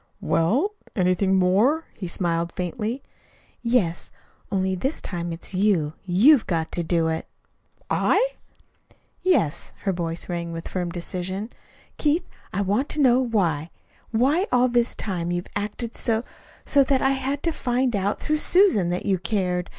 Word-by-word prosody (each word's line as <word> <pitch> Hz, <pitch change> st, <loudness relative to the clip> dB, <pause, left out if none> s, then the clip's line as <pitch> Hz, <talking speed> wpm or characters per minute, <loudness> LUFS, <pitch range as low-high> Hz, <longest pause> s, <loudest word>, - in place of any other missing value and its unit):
"Well? 200 Hz, -, +1 dB, 0.2 s
Anything 185 Hz, 0 st, +2 dB
more?" 205 Hz, -, +3 dB
He 185 Hz, -, -5 dB
smiled 170 Hz, -1 st, -1 dB
faintly. 215 Hz, +8 st, -3 dB, 0.6 s
"Yes; 230 Hz, -9 st, 0 dB, 0.4 s
only 190 Hz, -1 st, +1 dB
this 265 Hz, -, -2 dB
time 175 Hz, -2 st, -4 dB
it's 165 Hz, +3 st, -6 dB
you. 185 Hz, -6 st, +2 dB
YOU'VE 220 Hz, -, +5 dB
got 165 Hz, -3 st, -1 dB
to 175 Hz, -, -1 dB
do 165 Hz, 0 st, +1 dB
it." 160 Hz, 0 st, -2 dB, 0.6 s
"I?" -, -, +2 dB, 0.9 s
"Yes." 350 Hz, -, +1 dB
Her 195 Hz, -, +1 dB
voice 170 Hz, -1 st, -4 dB
rang 170 Hz, -1 st, -3 dB
with 165 Hz, 0 st, -6 dB
firm 180 Hz, -2 st, -2 dB
decision. 185 Hz, +5 st, -4 dB, 0.5 s
"Keith, 315 Hz, +4 st, +1 dB, 0.2 s
I 200 Hz, -, -1 dB
want 205 Hz, +8 st, 0 dB
to 305 Hz, -, -2 dB
know 255 Hz, -2 st, +5 dB
why 175 Hz, -, 0 dB, 0.4 s
why 280 Hz, -, +2 dB
all 250 Hz, 0 st, +4 dB
this 240 Hz, 0 st, +1 dB
time 175 Hz, -5 st, -3 dB
you've 175 Hz, 0 st, -2 dB
acted 210 Hz, +3 st, -3 dB
so 225 Hz, 0 st, 0 dB, 0.4 s
so 280 Hz, -1 st, +4 dB
that 265 Hz, -1 st, +1 dB
I 270 Hz, -, +4 dB
had 270 Hz, +1 st, -2 dB
to 335 Hz, -, +1 dB
find 250 Hz, -4 st, 0 dB
out 200 Hz, +1 st, 0 dB
through 305 Hz, 0 st, 0 dB
Susan 350 Hz, -, +4 dB
that 180 Hz, +1 st, -2 dB
you 195 Hz, -3 st, +1 dB
cared. 180 Hz, -1 st, -1 dB
195 Hz, 150 wpm, -24 LUFS, 175-255 Hz, 0.9 s, YOU'VE